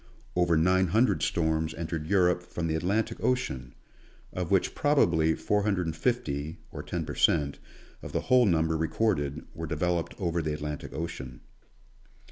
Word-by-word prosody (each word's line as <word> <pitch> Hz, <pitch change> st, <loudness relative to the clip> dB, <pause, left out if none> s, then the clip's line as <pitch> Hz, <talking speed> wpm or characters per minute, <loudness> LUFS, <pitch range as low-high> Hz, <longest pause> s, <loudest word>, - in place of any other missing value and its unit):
Over 85 Hz, -2 st, +3 dB
nine 90 Hz, +3 st, +3 dB
hundred 110 Hz, +8 st, +2 dB
storms 80 Hz, -1 st, 0 dB
entered 80 Hz, -2 st, -4 dB
Europe 90 Hz, -2 st, +3 dB
from 85 Hz, -1 st, -5 dB
the 80 Hz, -, 0 dB
Atlantic 105 Hz, +8 st, -1 dB
ocean, 65 Hz, -, -1 dB, 0.6 s
of 90 Hz, -2 st, -3 dB
which 95 Hz, -2 st, +2 dB
probably 80 Hz, -, +3 dB
four 105 Hz, 0 st, 0 dB
hundred 100 Hz, -3 st, 0 dB
and 80 Hz, -1 st, -3 dB
fifty, 80 Hz, -, -1 dB
or -, -, -6 dB
ten -, -, -4 dB
per -, -, -5 dB
cent, 70 Hz, -4 st, +2 dB, 0.4 s
of -, -, -8 dB
the -, -, -1 dB
whole 125 Hz, -3 st, +4 dB
number 80 Hz, -2 st, +2 dB
recorded, 80 Hz, -3 st, 0 dB
were 80 Hz, -1 st, -5 dB
developed 85 Hz, +2 st, -1 dB
over 85 Hz, -3 st, -1 dB
the 75 Hz, -1 st, -2 dB
Atlantic 75 Hz, 0 st, -5 dB
ocean. 65 Hz, -7 st, -6 dB
85 Hz, 155 wpm, -28 LUFS, 80-95 Hz, 0.6 s, whole